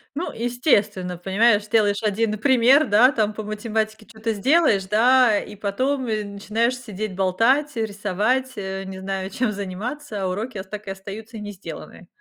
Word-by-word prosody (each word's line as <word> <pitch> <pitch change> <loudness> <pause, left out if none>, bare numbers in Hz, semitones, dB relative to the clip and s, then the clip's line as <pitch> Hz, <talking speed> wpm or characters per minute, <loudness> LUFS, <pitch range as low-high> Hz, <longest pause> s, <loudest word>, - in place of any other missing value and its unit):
Ну, 335 +5 -3
естественно, 220 - 0
понимаешь, 205 +4 +2
сделаешь 210 -2 +2
1 215 0 0
пример, 260 +3 +5
да, 220 +6 +6
там, 215 -5 0
по 215 - -6
математике 215 0 -3
чё-то 225 0 -4
сделаешь, 225 - +3
да, 230 +1 +4
и 210 - -9
потом, 255 +7 -1
и 215 -2 -1
начинаешь 215 +5 -1
сидеть, 215 -5 -6
болтать, 230 +11 +2
рисовать, 220 +4 -1
э, 190 -1 -4
не 190 0 -7
знаю, 190 0 -4
чем 245 +1 -1
заниматься, 205 +4 -5
а - - 0
уроки 210 +3 -4
так 210 +1 -9
и 195 - -3
остаются 210 +4 -8
не 210 -1 -6
сделанные. 195 -1 -10
215 Hz, 155 wpm, -23 LUFS, 200-240 Hz, -, да